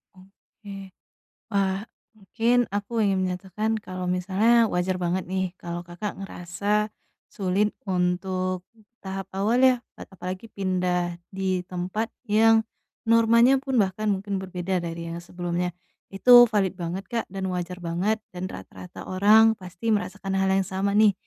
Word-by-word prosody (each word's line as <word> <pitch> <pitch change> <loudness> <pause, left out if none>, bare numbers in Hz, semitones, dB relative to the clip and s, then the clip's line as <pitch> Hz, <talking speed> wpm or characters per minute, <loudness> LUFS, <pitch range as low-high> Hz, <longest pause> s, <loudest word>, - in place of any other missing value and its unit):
Oke. 195 0 -13 0.6
Wah! 195 +2 0 0.3
Mungkin, 230 +5 +1
aku 205 +3 -3
ingin 190 -1 +1
menyatakan 190 +4 -2
kalau 185 -3 -5
misalnya 200 +6 +3
wajar 180 +1 0
banget 180 +1 -1
nih, 190 -1 -1
kalau 175 0 -5
Kakak 175 +4 -6
ngerasa, 200 +3 -2 0.4
sulit 200 +2 +1 0.2
untuk 185 0 -1
di 220 - -23 0.2
tahap 190 0 -5
awal 225 +6 +2
ya, 260 -1 +6 0.2
kan - - -11
apalagi 185 +4 -7
pindah 180 -3 -1
di 190 -2 -1
tempat 185 +5 -3 0.2
yang, 225 +1 +4 0.4
normanya 230 +3 +5
pun 265 -2 -1
bahkan 205 +2 0
mungkin 195 0 -2
berbeda 185 -1 -2
dari 170 0 -5
yang 170 - -6
sebelumnya. 175 0 -3 0.4
Itu 240 +4 +8
valid 195 -3 +1
banget, 180 +1 -4
Kak, 230 -1 -2
dan 195 -1 -4
wajar 180 0 -4
banget, 175 +6 0 0.2
dan 180 +1 -4
rata-rata 95 -1 -10
orang 215 +4 +6
pasti 185 +4 -3
merasakan 195 0 -2
hal 190 - +2
yang 190 0 +2
sama 195 +1 -1
nih, 215 -2 +6
190 Hz, 140 wpm, -25 LUFS, 180-210 Hz, 0.6 s, Itu